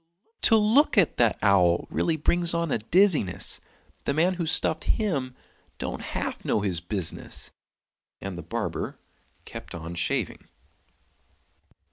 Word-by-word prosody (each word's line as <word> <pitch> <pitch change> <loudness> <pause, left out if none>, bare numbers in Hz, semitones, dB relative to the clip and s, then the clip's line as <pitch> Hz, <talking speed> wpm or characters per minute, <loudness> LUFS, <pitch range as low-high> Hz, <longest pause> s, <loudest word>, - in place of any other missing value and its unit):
To 225 - +6
look 225 +6 +4
at 185 -6 +4
that 115 -3 +3
owl 90 -4 +4
really 165 -1 0
brings 170 +2 +2
on 170 -2 -1
a - - +1
dizziness; 155 - +2 0.5
The 140 - 0
man 175 +4 +3
who 170 -3 -3
stuffed 160 0 +1
him 140 - -1 0.4
don't - - -4
half - - -4
know 105 - +1
his 95 -5 -1
business!" 90 -2 -4 0.7
And 95 -1 -6
the 85 - -6
barber 80 - -4 0.5
kept - - -9
on 85 +1 -6
shaving. 85 +1 -2
140 Hz, 130 wpm, -26 LUFS, -, 0.7 s, To